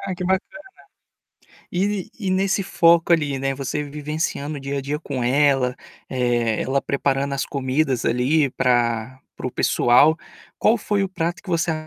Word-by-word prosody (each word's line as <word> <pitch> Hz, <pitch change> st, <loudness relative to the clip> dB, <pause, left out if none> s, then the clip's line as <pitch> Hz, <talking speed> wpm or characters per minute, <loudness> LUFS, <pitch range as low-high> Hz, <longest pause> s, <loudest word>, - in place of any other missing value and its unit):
Ah, 190 Hz, -2 st, -4 dB
que 180 Hz, -, -5 dB
bacana. 190 Hz, +1 st, +2 dB, 1.3 s
E 195 Hz, +1 st, -1 dB
e 195 Hz, -3 st, -2 dB
nesse 195 Hz, +1 st, +1 dB
foco 170 Hz, -2 st, +3 dB
ali, 145 Hz, -5 st, +2 dB
né, 135 Hz, 0 st, -1 dB
você 140 Hz, +2 st, -3 dB
vivenciando 150 Hz, 0 st, -4 dB
o -, -, -6 dB
dia 140 Hz, +1 st, -4 dB
a -, -, -2 dB
dia 145 Hz, +2 st, -3 dB
com 140 Hz, -5 st, -4 dB
ela, 135 Hz, -1 st, +2 dB, 0.3 s
eh, 120 Hz, -3 st, 0 dB
ela 135 Hz, +1 st, 0 dB
preparando 140 Hz, 0 st, -1 dB
as 135 Hz, -, -1 dB
comidas 135 Hz, -2 st, -1 dB
ali, 135 Hz, +5 st, +2 dB
pra 120 Hz, 0 st, 0 dB, 0.2 s
para -, -, -7 dB
o -, -, -2 dB
pessoal, 145 Hz, +7 st, +4 dB, 0.4 s
qual 225 Hz, +2 st, +3 dB
foi 205 Hz, -1 st, 0 dB
o 195 Hz, -, -3 dB
prato 170 Hz, -1 st, -3 dB
que 195 Hz, -, -10 dB
você 170 Hz, -1 st, +1 dB
145 Hz, 165 wpm, -22 LUFS, 130-170 Hz, 1.3 s, pessoal